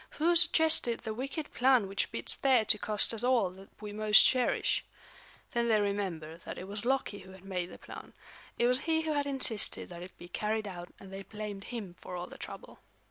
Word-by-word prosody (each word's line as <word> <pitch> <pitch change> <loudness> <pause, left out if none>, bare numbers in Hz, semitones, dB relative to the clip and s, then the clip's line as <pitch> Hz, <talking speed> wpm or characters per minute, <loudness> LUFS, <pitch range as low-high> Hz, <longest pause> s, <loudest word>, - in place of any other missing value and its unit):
"Who 340 +3 +3
suggested 320 -7 +5
the 220 - -4
wicked 275 +6 -5
plan 250 -4 +3
which 195 +1 -1
bids - - -3
fair 255 -5 +3
to 210 0 +4
cost 210 +2 +1
us 225 +1 +1
all 245 -7 +2
that 190 +1 -14
we 210 -1 -7
most 215 0 +6
cherish?" 255 -2 +2 0.7
Then 235 0 0
they 220 -2 +3
remembered 180 -6 -3
that - - -8
it 185 - -7
was 205 +2 -4
Loki 260 -5 0
who 190 0 -13
had 190 0 -15
made 180 -2 -3
the - - -12
plan; - - -11 0.4
it 240 - +2
was 250 +1 +3
he 320 +2 0
who 315 -1 -2
had 285 -1 -1
insisted 265 -6 +1
that 175 -1 -9
it 180 +1 -11
be 175 - -11
carried 215 +3 -2
out 175 -2 -8
and 195 -1 -12
they 195 - -6
blamed 210 -1 -7
him 220 -7 -6
for - - -8
all 175 0 -4
the - - -13
trouble. - - -9
215 Hz, 215 wpm, -31 LUFS, 195-255 Hz, 0.7 s, most